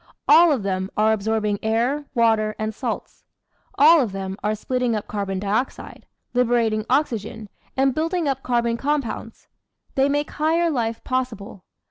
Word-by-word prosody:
All 340 0 +7
of 260 -8 0
them 190 -1 -2
are 215 +1 +4
absorbing 215 -1 -1
air, 240 +7 0
water, 220 -2 +2
and 215 0 -3
salts; - - -5 0.5
all 315 +2 +7
of 220 -7 -2
them 190 -1 -4
are 210 +1 0
splitting 250 +1 -1
up 210 - -4
carbon 200 -2 -3
dioxide, 205 +6 -3 0.3
liberating 230 -3 +1
oxy 260 -3 +2
gen, 220 0 -10 0.3
and 270 0 +3
building 330 +2 -1
up 270 -1 -1
carbon 235 -2 0
compounds: 275 -5 -3 0.5
they 270 +1 +2
make 290 +1 -1
higher 325 +2 +1
life 230 -4 -2
possible. 230 -7 -4
230 Hz, 150 wpm, -22 LUFS, 215-270 Hz, 0.5 s, All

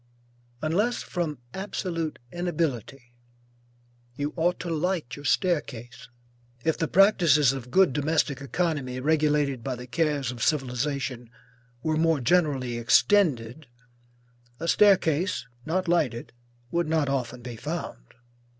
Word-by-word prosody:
Unless 205 +10 0
from 165 -5 -3 0.2
absolute 175 -5 -3 0.2
inability, 140 - -3 1.0
you 145 +2 -3
ought 175 +1 +1
to 175 - -5
light 165 -4 -1
your 145 - -11
staircase. 135 -9 -1 0.6
If 160 - +2
the 165 - -1
practices 165 - +5
of 125 -2 -7
good 185 0 +4
domestic 145 -1 0
economy 140 -2 -2
regulated 150 -3 +1
by 130 0 -2
the 125 0 -9
cares 145 -2 0
of 120 -2 -9
civilization, 130 -2 -1 0.5
were 155 -1 0
more 165 -1 +2
generally 135 -5 +1
extended, 140 - +2 0.9
a 165 - -4
staircase 180 - +3 0.2
not 185 +3 0
lighted 135 -11 0 0.4
would 170 -1 0
not 160 -3 +1
often 125 -3 -3
be 120 -1 -7
found. 115 - -6
150 Hz, 115 wpm, -26 LUFS, 130-170 Hz, 1.0 s, practices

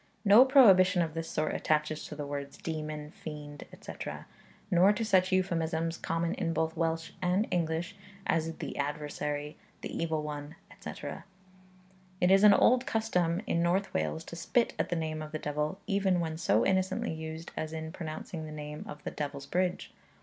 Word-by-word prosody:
No 210 +6 +9
prohibition 190 -10 +6
of 160 -2 -4
this 165 0 -4
sort 155 0 -1
attaches 155 0 0
to 150 - -7
the 145 -1 -4
words 140 0 -5
demon, 155 -2 -5
fiend, 150 -2 -8
etc., - - -7 0.5
nor 180 +3 +6
to 225 +2 -2
such 185 -3 +3
euphemisms, 165 -3 0
common 165 +1 -1
in 165 -1 -1
both 160 0 0
Welsh 165 0 -1
and 185 +4 +2
English, 170 +2 -1 0.3
as 165 0 +1
the - - -5
adversary, 150 +1 -3 0.2
the - - -6
evil 160 -2 -1
one, 150 +1 -6 0.2
etc. - - -7 1.0
It 180 0 +4
is 195 +1 +6
an 210 -1 +9
old 255 +2 +4
custom 185 -8 +1
in 170 - +1
North 180 +3 +1
Wales 160 - -1
to 170 - -9
spit 230 +8 +1
at - - 0
the 175 - 0
name 155 -1 -2
of 155 0 -8
the - - 0
devil, 150 +4 -2
even 195 -3 +2
when 160 -2 -2
so 115 - +2
innocently 190 +3 +1
used 160 +1 -7
as 155 - -3
in 160 0 -5
pronouncing 160 -1 -6
the - - -8
name 150 0 -6
of 150 - -9
the - - -4
Devil's 140 -1 -4
Bridge. 180 +2 -1
165 Hz, 175 wpm, -30 LUFS, 155-185 Hz, 1.0 s, No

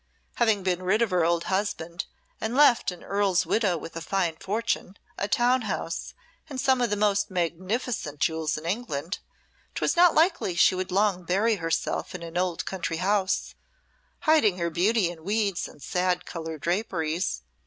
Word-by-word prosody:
Having 220 -5 +2
been 180 -1 0
rid 200 +5 +2
of 220 - -1
her 180 -2 +3
old 170 0 +2
husband 190 -3 -2 0.3
and 220 +2 -2
left 285 -4 +5
an 180 -2 -8
earl's 200 -3 +1
widow 200 -6 +1
with 165 +1 -9
a 165 - -4
fine 175 -1 0
fortune, 205 +1 -2 0.2
a 200 - 0
town 245 +4 +3
house, 175 -6 -4 0.3
and 270 -3 -5
some 260 -1 +3
of 240 - +2
the 210 - +1
most 205 -1 +1
magnificent 185 - -2
jewels 160 -1 0
in 155 - -8
England, 175 -4 -3 0.6
'twas - - +1
not 350 -1 +6
likely 325 - +2
she 170 - +5
would 185 0 -3
long 195 -1 +2
bury 205 +6 +2
herself 165 +2 -2
in 175 - -6
an 165 0 -8
old 180 -1 -1
country 170 -3 -3
house, 190 +1 0 0.7
hiding 300 - +4
her 170 -1 -1
beauty 195 +4 +2
in 160 -2 -12
weeds 200 -1 0
and 145 - -15
sad 180 0 0
coloured 160 -2 -6
draperies. 170 -2 -1
185 Hz, 170 wpm, -26 LUFS, 170-215 Hz, 0.7 s, not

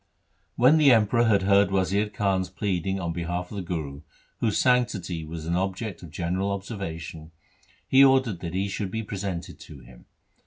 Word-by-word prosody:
1 120 - -4
When 160 - +5
the 145 -3 +6
Emperor 115 +1 +4
had 100 -4 +3
heard 100 0 +4
Wazir 95 +2 +1
Khan's 100 -3 -1
pleading 95 -1 -2
on 85 -2 -3
behalf 90 +1 -4
of 105 - -6
the - - -2
Guru, 80 -5 -5 0.4
whose 110 -3 0
sanctity 100 -10 +1
was 80 0 -7
an 85 +1 -1
object 95 +2 -3
of 85 - -10
general 90 +5 -2
observation, 85 -6 -6 0.6
he 135 +1 +6
ordered 130 -8 +3
that 85 0 -6
he 95 +1 0
should 100 0 -3
be 110 +3 -4
presented 95 -4 -5
to 70 -4 -12
him. - - -16
95 Hz, 180 wpm, -26 LUFS, 85-105 Hz, 0.6 s, the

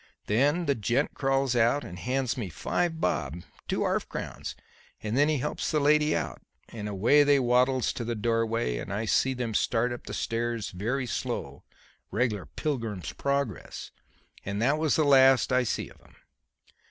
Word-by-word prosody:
Then 145 +11 +2
the 140 - +2
gent 120 +4 0
crawls 135 -2 +1
out 120 +5 +3
and 90 0 -8
hands 130 +1 -1
me 115 -8 -4
five 165 - -1
bob 85 - -1 0.2
two - - 0
'arf - - -1
crowns - - -6 0.5
and 110 +1 -2
then 145 +3 +4
he 155 - +2
helps 145 +3 -2
the 155 - +2
lady 150 +1 +3
out, - - -3 0.3
and 105 -2 -6
away 110 +9 +4
they 145 -1 +5
waddles 125 +1 +2
to 120 - -4
the 120 0 -2
doorway 115 - 0
and - - -6
I 105 +3 -2
see 130 +4 +2
them 120 -3 -3
start 120 +3 +1
up 120 - -9
the - - -4
stairs 115 -1 -2
very 115 +9 -2
slow - - -4 0.4
regler 105 -3 -1
Pilgrim's 115 - -3
Progress. 140 - -3 0.5
And 100 +1 -3
that 140 +7 +2
was 155 -2 +2
the 155 - +3
last 135 -3 +5
I 125 - +4
see 120 - -2
of - - -19
'em." - - -22
125 Hz, 175 wpm, -28 LUFS, 110-140 Hz, 0.5 s, they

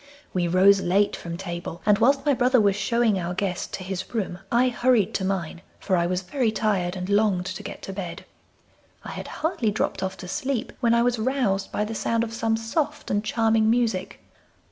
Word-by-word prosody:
We 180 -2 +1
rose 190 +3 +5
late 195 +3 +2
from 170 0 -6
table, 175 -2 -6
and 210 -1 +4
whilst 275 +3 +3
my 290 - +4
brother 255 0 +3
was 200 -2 +3
showing 220 0 +1
our 175 0 -3
guest 185 -2 -2
to 185 - -7
his 190 +4 -5
room 190 -5 -2
I 245 +2 +4
hurried 245 -3 +2
to 190 - -1
mine, 185 -3 -2 0.2
for 190 - 0
I 170 -1 +2
was 180 +1 -1
very 225 +5 0
tired 195 -5 0
and 180 0 -4
longed 200 -3 +2
to 185 0 -5
get - - -8
to 195 - -6
bed. 185 -3 -6 0.8
I - - -7
had - - -6
hardly 310 -9 -1
dropped 205 - -1
off 190 0 -3
to 180 - -8
sleep 270 +3 -2
when 235 -2 +3
I 235 - +3
was 245 -1 +1
roused 220 -5 0
by 210 - -1
the 220 - -5
sound 230 +1 0
of 225 -1 -5
some 225 0 0
soft 295 +6 -2
and 205 0 +1
charming 225 0 +2
music. 230 -5 0
205 Hz, 210 wpm, -25 LUFS, 185-235 Hz, 0.8 s, rose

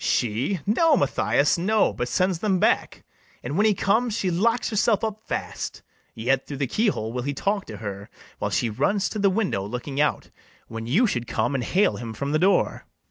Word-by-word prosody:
BARABAS. - - +1
She! 125 - -1
no, 295 +10 +4
Mathias, 120 - +2
no, 210 +4 +2
but 120 - -3
sends 185 +5 0
them 195 -2 +1
back; - - +1 0.4
And, 130 +5 -4
when 210 +4 +4
he 210 - +3
comes, 225 +3 +1
she 185 - 0
locks 230 +9 +1
herself 215 0 +2
up 215 -1 -2
fast; - - -4 0.3
Yet 130 +4 0
through 140 - -6
the 140 - 0
key 215 - 0
hole 110 - -1
will 125 - -2
he 140 +2 -3
talk 200 +5 -1
to 105 - -8
her, 100 -1 -7 0.3
While - - -1
she 120 - 0
runs 190 - 0
to 215 - -4
the 200 -1 +4
window, 190 - 0
looking 125 +7 -3
out 150 - 0 0.4
When 115 0 -6
you 185 - +3
should 120 - -2
come 120 +3 -1
and 130 -3 -1
hale 195 +10 +2
him 115 -2 -6
from 140 +4 -3
the 155 - +2
door. 190 +3 +1
155 Hz, 210 wpm, -24 LUFS, -, 0.4 s, no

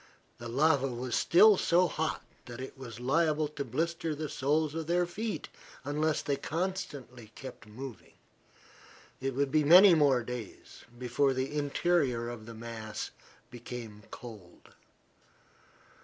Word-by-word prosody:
The 120 - -7
lava 140 +2 +3
was 125 0 -4
still 205 +4 +6
so 180 +1 +3
hot 160 -1 -2 0.2
that 120 0 -8
it 130 +1 -7
was 120 -5 -9
liable 155 +4 +2
to 145 -1 -4
blister 165 +5 -2
the 155 0 -4
soles 150 +2 0
of 160 -1 -4
their 175 +1 +2
feet 215 +5 -4 0.4
unless 150 +2 0
they 140 -1 0
kept - - -8
constantly 140 - -4 0.4
moving. 120 +1 -10 1.0
It 135 -1 -3
would 140 0 0
be 155 0 +3
many 180 +5 +9
more 140 -6 +4
days 120 -3 -8
before 125 +3 +1
the 130 +3 -2
interior 145 -5 +1
of 115 -2 -8
the 115 - -9
mass 110 -1 -6 0.4
became 120 -3 -8
cold. 105 -8 -12
140 Hz, 135 wpm, -30 LUFS, 120-160 Hz, 1.0 s, many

